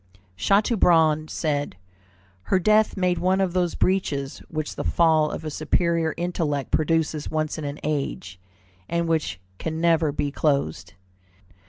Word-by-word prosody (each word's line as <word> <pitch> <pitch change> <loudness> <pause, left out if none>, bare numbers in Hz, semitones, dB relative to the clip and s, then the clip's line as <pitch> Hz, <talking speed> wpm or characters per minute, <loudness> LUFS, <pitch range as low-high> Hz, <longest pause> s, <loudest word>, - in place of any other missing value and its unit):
Chateaubriand 165 - +3
said, 145 - -2 0.7
"Her 190 - +4
death 215 +4 +3
made 180 -2 +1
one 185 +2 +2
of 190 -3 0
those 180 -2 0
breaches 145 -8 -1
which 155 -2 -4
the - - -4
fall 160 -2 +3
of 160 - -6
a 155 - -3
superior 165 +1 0
intellect 165 -5 -2
produces 155 -1 0
once 155 0 -2
in 150 - -5
an 145 +1 -4
age, 140 -11 -3 0.5
and 170 0 0
which 160 - -1 0.2
can 160 0 -3
never 165 -2 +3
be 145 0 -2
closed." 100 - -1
160 Hz, 140 wpm, -24 LUFS, 145-175 Hz, 0.7 s, Her